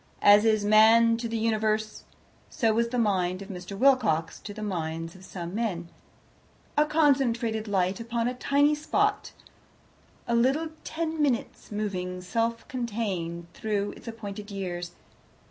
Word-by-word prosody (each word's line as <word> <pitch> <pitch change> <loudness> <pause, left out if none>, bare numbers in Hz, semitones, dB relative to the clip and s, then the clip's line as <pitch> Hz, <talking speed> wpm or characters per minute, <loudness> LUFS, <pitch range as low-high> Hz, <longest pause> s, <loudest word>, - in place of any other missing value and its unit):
As 205 +1 +7
is 215 -2 +3
Man 225 +2 +6
to 230 0 -3
the 230 - -2
Universe, 215 -1 -1 0.4
so 225 -7 +1
was 230 +1 +2
the 250 +1 -3
mind 190 -4 +1
of 195 - -13
Mr. 185 +1 -7
Wilcox 210 - +2
to 210 - -8
the 215 +1 -7
minds 165 -4 -3
of 185 - -15
some 175 -2 -7
men 195 -7 -2 0.9
a 300 +1 +3
concentrated 250 -8 +2
light 190 -1 0
upon 230 0 -2
a 250 - -1
tiny 285 +4 +2
spot, 405 +8 0 1.0
a 235 - 0
little 265 +7 +2
Ten 320 -1 -3
Minutes 260 -7 -1
moving 185 -4 -3
self 230 +5 -2
contained 205 -9 -3
through 205 -2 -2
its - - -14
appointed 210 -2 -7
years. 175 -3 -5
220 Hz, 145 wpm, -27 LUFS, 190-235 Hz, 1.0 s, As